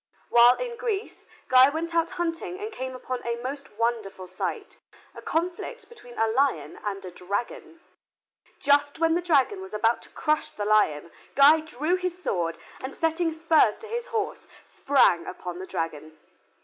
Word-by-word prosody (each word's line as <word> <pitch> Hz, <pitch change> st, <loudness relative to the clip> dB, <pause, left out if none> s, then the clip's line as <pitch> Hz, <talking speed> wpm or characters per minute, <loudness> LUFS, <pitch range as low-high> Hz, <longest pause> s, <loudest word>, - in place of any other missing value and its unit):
While 240 Hz, +1 st, +7 dB
in 480 Hz, -1 st, -5 dB
Greece, 440 Hz, -4 st, -4 dB, 0.2 s
Guy 255 Hz, +1 st, +7 dB
went 330 Hz, +3 st, -4 dB
out 335 Hz, 0 st, +2 dB
hunting 345 Hz, +2 st, -3 dB
and 425 Hz, +2 st, -5 dB
came 260 Hz, -9 st, -5 dB
upon 255 Hz, 0 st, -5 dB
a 235 Hz, 0 st, -1 dB
most 275 Hz, +1 st, -6 dB
wonderful 215 Hz, -4 st, -2 dB
sight, 185 Hz, +1 st, -5 dB, 0.3 s
a -, -, -10 dB
conflict 360 Hz, +9 st, -3 dB
between 245 Hz, -, -14 dB
a 225 Hz, -, +3 dB
lion 220 Hz, -, 0 dB
and 195 Hz, -2 st, -4 dB
a 180 Hz, -, -7 dB
dragon. 205 Hz, -, -5 dB, 0.8 s
Just 285 Hz, +1 st, +2 dB
when 325 Hz, 0 st, +2 dB
the 345 Hz, -, +1 dB
dragon 345 Hz, +3 st, +2 dB
was 380 Hz, -, -8 dB
about 225 Hz, +2 st, +2 dB
to -, -, -15 dB
crush 305 Hz, -1 st, 0 dB
the 205 Hz, -, -5 dB
lion 170 Hz, -7 st, +2 dB, 0.2 s
Guy 290 Hz, +3 st, +7 dB
drew 315 Hz, +3 st, -1 dB
his 365 Hz, -1 st, -3 dB
sword, 170 Hz, -, -2 dB, 0.3 s
and 260 Hz, -, -5 dB
setting 325 Hz, +1 st, 0 dB
spurs 320 Hz, -8 st, +3 dB
to 445 Hz, -, -10 dB
his 475 Hz, +2 st, -4 dB
horse, 440 Hz, -2 st, -3 dB, 0.2 s
sprang 195 Hz, -11 st, +2 dB
upon 180 Hz, -1 st, -6 dB
the 190 Hz, -, -7 dB
dragon. 155 Hz, -1 st, -5 dB
280 Hz, 165 wpm, -26 LUFS, 210-335 Hz, 0.8 s, While